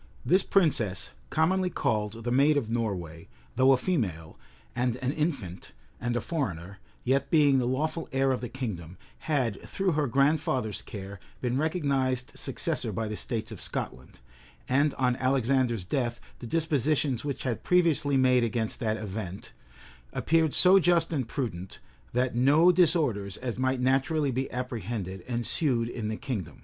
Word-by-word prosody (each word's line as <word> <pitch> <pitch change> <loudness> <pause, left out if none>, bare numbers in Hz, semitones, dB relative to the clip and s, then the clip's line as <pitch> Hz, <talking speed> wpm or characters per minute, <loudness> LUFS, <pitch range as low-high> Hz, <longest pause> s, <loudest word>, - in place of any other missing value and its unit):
This 185 +3 +4
princess, 125 - +1 0.2
commonly 185 +4 +2
called 110 - -1
the 120 - -2
Maid 140 +4 +4
of 115 -6 -2
Norway, 90 -8 -3 0.3
though 130 +1 +5
a 135 - +5
female, 100 - -2 0.4
and 125 -1 0
an 130 +1 -2
infant, 140 - -3 0.3
and 120 +1 -2
a 120 - 0
foreigner, 100 - -4 0.2
yet 135 +2 +1
being 145 -4 +4
the 120 - 0
lawful 155 +6 -2
heir 135 0 +2
of 130 - -1
the 125 - -4
kingdom, 95 -10 -5 0.2
had, 130 -10 -1
through 195 -2 -1
her 150 -2 +1
grandfather's 130 -5 +1
care, 100 -1 -8 0.2
been 125 -1 -1
recognized 135 -5 0
successor - - -2
by 110 -1 -2
the 105 - -4
states 110 0 -4
of 110 - -8
Scotland;[] 65 0 -6 0.5
and 140 +3 +2
on 125 -2 +1
Alexander's 130 -4 +1
death, 120 +1 -1 0.2
the 120 - -7
dispositions 150 -3 +1
which 140 -2 -4
had 120 -4 -1
been - - -20
previously 155 -6 +3
made 130 -2 +4
against 115 -1 -1
that 110 -2 0
event, 100 -3 -6 0.6
appeared 160 -2 +2
so 190 +1 +7
just 170 -1 +2
and 130 -6 -1
prudent, 100 - -4 0.3
that 125 +1 0
no 145 +8 +5
disorders, 150 - +2
as 125 -2 -4
might 130 0 +1
naturally 135 +3 +1
be 130 +2 -2
apprehended, 115 -7 -4
ensued 120 0 +1
in 115 -2 -4
the 110 0 -3
kingdom. 125 - -5
130 Hz, 155 wpm, -28 LUFS, 110-145 Hz, 0.6 s, so